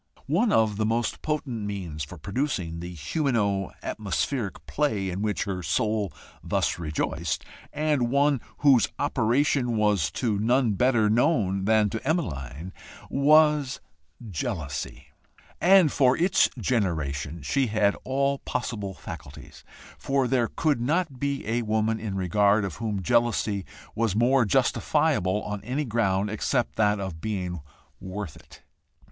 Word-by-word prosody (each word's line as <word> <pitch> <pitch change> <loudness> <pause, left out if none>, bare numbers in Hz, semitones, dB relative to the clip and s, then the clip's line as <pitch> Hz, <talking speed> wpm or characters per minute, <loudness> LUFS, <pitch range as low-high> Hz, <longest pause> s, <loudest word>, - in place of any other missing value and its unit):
One 195 - +2
of 110 -2 +2
the 110 - +1
most 115 0 -1
potent 130 -8 -3
means 90 -7 -4
for 90 +5 -9
producing 95 - -2
the 90 +1 -6
humano 100 - 0
atmospheric 105 +2 -3
play 105 -11 -1
in 95 +3 -4
which 105 -1 0
her 95 -3 -4
soul 105 +3 0 0.3
thus 80 - 0
rejoiced, 80 0 -2 0.3
and 150 -5 0
one 140 0 +2 0.2
whose 130 -5 +6
operation 125 -2 +1
was 105 -9 +2
to 110 -5 -1
none 120 +2 +2
better 110 +1 +3
known 105 - +2
than 110 0 +4
to 110 - -3
Emmeline, 85 - -3 0.4
was 150 -1 +4 0.5
jealousy, 80 - -4 0.5
and 185 -4 +6
for 130 -2 +3
its 180 +2 +3
generation 80 - -1
she 135 - +1
had 105 -2 +2
all 140 +1 0
possible 105 -6 -4
facilities 75 -6 -10 0.4
for 135 -2 +1
there 120 -2 +2
could 145 -2 0
not 150 0 0
be 140 -3 -2
a 115 +2 0
woman 110 0 0
in 105 -3 -4
regard 100 +3 +2
of 95 - -6
whom 105 -4 -3
jealousy 115 -3 +1 0.3
was 115 -3 0
more 120 +2 +4
justifiable 95 0 +1
on 105 -1 -5
any 135 +6 -2
ground 105 -4 +1
except 110 - -1
that 105 -1 +2
of 95 -5 -5
being 90 -5 -3 0.4
worth 95 -3 -6
it. - - -17
110 Hz, 135 wpm, -26 LUFS, 95-130 Hz, 0.5 s, whose